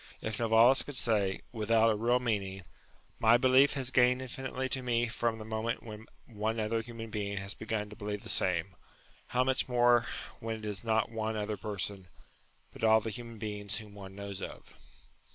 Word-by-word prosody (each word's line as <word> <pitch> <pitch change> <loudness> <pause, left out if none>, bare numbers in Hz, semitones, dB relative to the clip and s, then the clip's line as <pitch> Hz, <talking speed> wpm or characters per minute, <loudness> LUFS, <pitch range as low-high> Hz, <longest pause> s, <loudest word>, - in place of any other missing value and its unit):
If 110 -1 -4
Novalis 115 +3 +5
could 145 - -7
say, 105 -6 +3
not - - -7 0.2
without 115 +1 +4
a - - +1
real 120 +4 +2
meaning, 100 -5 -2 0.3
" - - -34
My 115 +1 +6
belief 130 +2 +5
has 135 -2 -1
gained 125 0 +4
infinitely 130 0 -4
to 130 - -1
me 120 -1 +1
from 115 0 -1
the 110 - -8
moment 110 +1 -2
when 110 -1 -9 0.2
one 110 0 -2
other 110 +1 0
human 115 -1 -8
being 100 -1 -3
has 100 +1 -3
begun 110 -1 -3
to - - -9
believe 105 -2 -5
the - - -9
same," 90 +1 0 0.5
how 125 +1 +2
much 130 0 0
more 120 -1 +4 0.3
when 115 -1 -3
it 110 - -9
is 105 0 -1
not 110 0 +1
one 110 -1 -2
other 105 0 -2
person, 100 -2 -4 0.7
but - - -10
all 110 0 +6
the 110 +1 -4
human 115 0 -8
beings 105 -1 -3
whom 105 -2 -9
one 95 -1 -10
knows 100 -1 -6
of. - - -8
110 Hz, 195 wpm, -31 LUFS, 105-120 Hz, 0.7 s, My